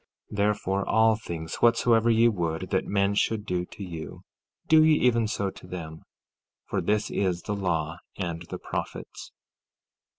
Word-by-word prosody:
14:12 105 - -6
Therefore, 100 -1 0
all 110 0 +5
things 85 -7 -6
whatsoever 115 -1 +4
ye 115 +1 +5
would 85 -7 -2
that - - 0
men 100 0 +2
should 105 +1 0
do 90 -2 -1
to 100 - -9
you, 85 -4 -7 0.4
do 160 0 +7
ye 155 -1 +5
even 115 -5 +3
so 100 -2 -2
to 90 - -14
them, 80 -3 -7 0.6
for - - -2
this 105 0 0
is 90 -3 0
the 105 - -2
law 85 -4 -1 0.2
and 85 -3 -3
the - - -4
prophets. - - -6
100 Hz, 160 wpm, -27 LUFS, 90-110 Hz, 0.6 s, do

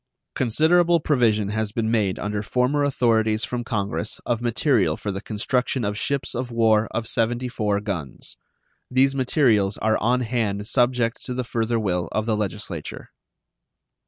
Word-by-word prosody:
Considerable 165 +8 +3
provision 115 -9 +2
has 110 0 -2
been 110 0 -1
made 105 -5 +1
under 105 0 -2
former 125 +6 +1
authorities 110 -5 +2
from 120 -1 -3
Congress 105 -2 -3
of 120 -1 -1
material 115 - +2
for 105 - -4
the 95 0 -5
construction 125 +3 -1
of 105 0 -1
ships 140 +5 -2
of 125 +1 -3
war 110 -2 +3
of 115 -1 -3
74 115 -3 0
guns. 85 - -5 0.5
These 135 +2 +3
materials 120 -7 +2
are 110 0 +1
on 125 +3 +2
hand 110 -4 -1
subject 120 -1 +1
to 125 - -4
the 125 - -1
further 115 -1 -1
will 90 -5 -1
of 110 - 0
the 110 -2 +1
Legislature. 100 -5 -5
115 Hz, 150 wpm, -23 LUFS, 105-125 Hz, 0.5 s, Considerable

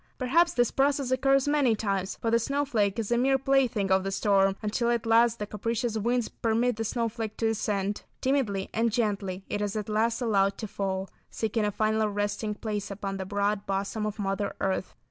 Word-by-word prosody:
Perhaps 335 +7 +2
this 245 -1 +2
process 275 -1 +1
occurs 270 +1 +3
many 285 -6 +3
times, 195 -3 -2
for 225 - -2
the 230 - +4
snowflake 235 -6 0
is 225 -1 -3
a 240 - +3
mere 270 +2 +3
plaything 255 -7 +1
of 190 0 +4
the 195 - -2
storm, 195 -1 +2
until 230 +3 0
at 235 -2 0
last 230 +1 +4
the 210 - -3
capricious 230 +3 -2
winds 235 +2 0
permit 230 +1 0
the 225 - -1
snowflake 225 -1 -3
to 225 - +1
descend. 205 -2 -1 0.2
Timidly 245 -8 0
and 230 +1 +1
gently 200 -4 -1
it 205 - -3
is 205 0 -2
at 215 -1 -3
last 225 +2 +1
allowed 200 -5 +2
to 215 - -5
fall, 195 -1 -3 0.2
seeking 220 -1 -1
a 210 - 0
final 215 +1 +1
resting 205 +1 -2
place 210 -2 -4
upon 195 -1 -4
the 190 -1 -5
broad 205 0 -1
bosom 200 +2 -2
of 210 - -5
Mother 200 0 -2
Earth. 190 -1 -2
215 Hz, 195 wpm, -28 LUFS, 200-240 Hz, 0.2 s, the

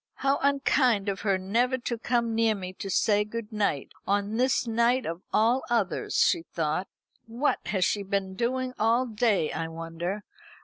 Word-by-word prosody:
"How 275 +1 +1
unkind 260 -6 +2
of 195 - -3
her 195 -2 +2
never 235 +7 +1
to 240 -1 -3
come 235 0 0
near 225 -1 +2
me 185 -2 -6
to 195 - -6
say 205 +2 +3
good 215 +1 -6
night, 205 -10 -1 0.2
on 205 +2 0
this 255 +1 +2
night 235 +2 +2
of 165 +2 -4
all 235 +4 +3
others!" 225 -6 0
she - - +4
thought, 165 +2 -2 0.4
"What 240 +6 0
has 190 -3 +1
she 205 - 0
been 195 -1 -2
doing 255 +4 -1
all 230 +4 +3
day, 215 -7 +1
I 165 - -3
wonder? 165 +5 -5
215 Hz, 170 wpm, -27 LUFS, 190-240 Hz, 0.4 s, she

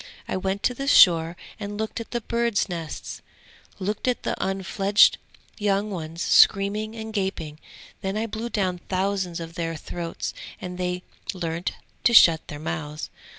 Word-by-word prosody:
I - - -2
went 190 +1 -2
to 250 - +2
the 275 +3 -5
shore 170 -8 +6 0.2
and 205 0 -5
looked 220 +1 -3
at 230 - -7
the 240 - -2
birds' 235 -1 0
nests, 165 -4 -6 0.6
looked 205 +5 -3
at 250 - 0
the - - 0
unfledged 195 +1 +3 0.4
young 205 0 +1
ones 165 -1 -4
screaming 210 +2 +4
and 220 -1 -6
gaping; 170 -7 -3 0.4
then 195 +2 -2
I 220 - 0
blew 225 +1 -4
down 185 -5 -1
thousands 190 -2 -1
of 165 0 -7
their 165 -1 -3
throats 165 +2 -5 0.3
and 180 0 -7
they 180 0 -2 0.3
learnt 170 -1 -2 0.3
to 235 - +5
shut 165 -6 +7
their 145 - -6
mouths. 150 0 -5
190 Hz, 155 wpm, -25 LUFS, 170-215 Hz, 0.6 s, shut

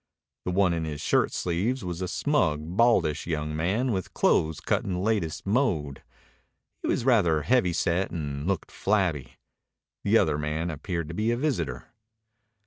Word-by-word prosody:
The 90 - -1
one 90 -1 +3
in 85 -1 -2
his 75 -2 -4
shirt - - +2
sleeves 95 +7 -1
was 90 0 -4
a 90 - -1
smug, 90 - +1 0.2
baldish 100 -11 +3
young 75 -2 -2
man 100 +11 0
with 95 -4 -3
clothes 80 -1 +2
cut - - 0
in 95 - -3
the - - -2
latest 95 -5 -1
mode. 95 - 0 0.8
He - - -3
was 115 - 0
rather 85 - +3
heavy 120 - +3
set 85 +3 0
and 75 -2 -4
looked 95 -4 -2
flabby. 85 - 0 0.7
The - - +4
other 75 -1 +2
man 75 +3 -2
appeared 85 +1 -4
to - - -5
be 110 +6 0
a 120 - +1
visitor. 85 - -2
85 Hz, 165 wpm, -27 LUFS, 75-105 Hz, 0.8 s, The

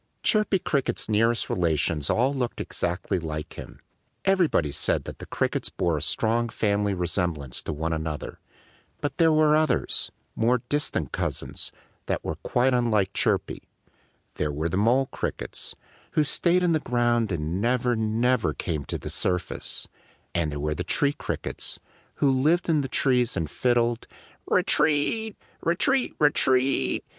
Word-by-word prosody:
Chirpy 215 -2 +3
Cricket's 140 -6 -1
nearest 115 +2 +2
relations 80 -3 0
all 130 +4 +2
looked 125 -3 -2
exactly 90 +2 -2
like 75 -2 -5
him. - - -10 0.5
Everybody 175 - +3
said - - 0
that - - -8
the - - -9
Crickets - - -1
bore 85 -2 0
a 75 - -2
strong 115 +9 +1
family 105 -2 0
resemblance 85 -6 -2
to - - -4
one 80 +2 -2
another. 80 -1 -4 0.6
But 145 - -3
there 165 -2 +5
were 155 -1 +5
others 155 0 +1 0.2
more 120 +1 +2
distant 145 - -1
cousins - - -3 0.4
that - - -2
were - - -3
quite 125 +1 +1
unlike 110 -6 +2
Chirpy. - - 0 0.8
There 75 - 0
were 80 +3 -2
the 85 - -2
Mole 120 +7 +3
Crickets, - - -4 0.4
who 155 - +3
stayed 175 +4 +2
in 175 - +3
the 160 - +3
ground 120 -4 +1
and 85 +2 -2
never, 125 +1 +2
never 110 - +1
came 75 0 -3
to - - -3
the - - -7
surface; 90 -2 -2 0.5
and 80 -3 0
there 75 - -4
were 75 +1 -1
the - - -3
Tree 145 0 +1
Crickets, - - -4 0.4
who 140 - +3
lived 155 +7 +2
in 155 -3 +3
the 135 - -3
trees 125 -2 +2
and 80 - -1
fiddled 120 +3 +1 0.4
_re - - +3
teat! 160 +9 +2 0.2
re 170 - +1
teat 265 +7 +1
re 150 -1 +5
teat! 130 0 +2
120 Hz, 155 wpm, -26 LUFS, 85-145 Hz, 0.8 s, there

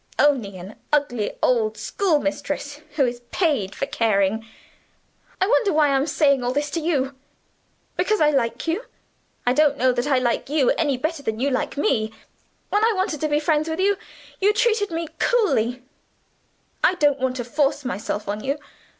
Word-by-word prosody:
Only 245 -10 +2
an 185 +4 -10
ugly 250 -8 0
old 220 -3 +2
schoolmistress, 290 - -1
who 280 -3 +3
is 240 0 -3
paid 275 - 0
for - - -2
caring. 220 -4 +1 1.0
I 380 - +3
wonder 430 -1 +3
why 300 -2 +4
I 275 - +2
am 270 +2 +1
saying 280 -5 +3
all 245 - 0
this? 290 +1 -1
Because 310 +6 -3
I 300 -1 +4
like 235 -4 0
you? 360 +9 -1 0.6
I 245 - +3
don't 290 0 +3
know 255 -1 +3
that 245 +2 -1
I 275 -3 +3
like 245 0 0
you 290 -3 +3
any 290 -5 +1
better 315 +3 -2
than 220 -5 -3
you 275 +3 +1
like 255 - -2
me. 220 -6 +1 0.6
When 415 +1 +2
I 455 0 +4
wanted 375 -6 -1
to 310 - +1
be 295 0 +1
friends 310 0 +1
with 320 +2 -3
you, 400 +2 +3 0.4
you 410 +2 +4
treated 430 -1 +2
me 330 0 -3
coolly; 255 - +1 1.0
I 370 - +4
don't 290 -4 +2
want 255 0 0
to 245 - -3
force 280 +2 0
myself 210 -2 -3
on 210 +1 -3
you. 275 +2 -1
285 Hz, 175 wpm, -23 LUFS, 245-315 Hz, 1.0 s, why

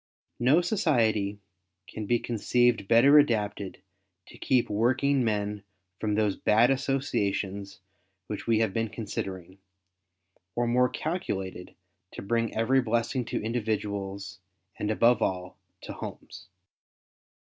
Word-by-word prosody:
No 135 +8 +4
society 115 - +1 0.5
can 110 -2 -6
be 120 - +3
conceived 120 -2 +1
better 135 +7 +7
adapted 105 -7 -1 0.5
to - - -13
keep 125 -2 +2
working 130 +5 +2
men 105 -2 -1 0.4
from 105 -1 -1
those 105 -2 +1
bad 115 +4 +3
associations 100 -8 -2 0.4
which 105 +3 -6
we 115 -1 +3
have 110 -4 0
been 115 -1 -1
considering, 95 -4 -6 1.0
or 120 - +1
more 125 +1 +3
calculated 100 - -4 0.4
to - - -7
bring 115 +2 0
every 130 +4 +3
blessing 120 +2 -1
to - - -3
individuals, 100 -4 -3 0.4
and 105 - -2
above 115 +2 +3
all 90 0 -2 0.2
to - - -7
homes. 85 0 -9
110 Hz, 115 wpm, -28 LUFS, 100-125 Hz, 1.0 s, better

